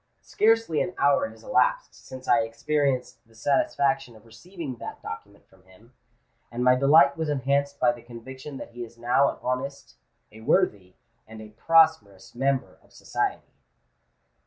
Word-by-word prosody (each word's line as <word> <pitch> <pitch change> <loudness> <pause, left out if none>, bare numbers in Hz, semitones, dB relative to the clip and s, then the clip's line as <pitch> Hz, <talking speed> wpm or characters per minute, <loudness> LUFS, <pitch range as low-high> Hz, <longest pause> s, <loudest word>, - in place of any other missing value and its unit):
Scarcely 225 -8 +2
an 180 - -3
hour 145 - +2
has - - -16
elapsed - - +1
since 130 0 -12
I 120 - +5
experienced 130 +3 -1
the 115 - -24
satisfaction 140 +2 0
of 110 +1 -18
receiving 135 - -9
that - - -8
document 100 +2 -9
from 95 0 -24
him; 105 +7 -21 0.6
and 120 +1 -3
my 125 0 +6
delight 140 +2 +5
was 160 -1 -2
enhanced 140 0 0
by 125 - +4
the 120 0 -10
conviction 130 +4 -10
that - - -9
he 120 +1 -7
is 115 0 -12
now 125 +4 +2
an - - -6
honest—a 125 -4 -7
worthy—and 110 - -2
a 110 -1 -10
prosperous 155 -5 +2
member 135 0 -1
of - - -27
society." - - -4
130 Hz, 150 wpm, -25 LUFS, 115-150 Hz, 0.6 s, my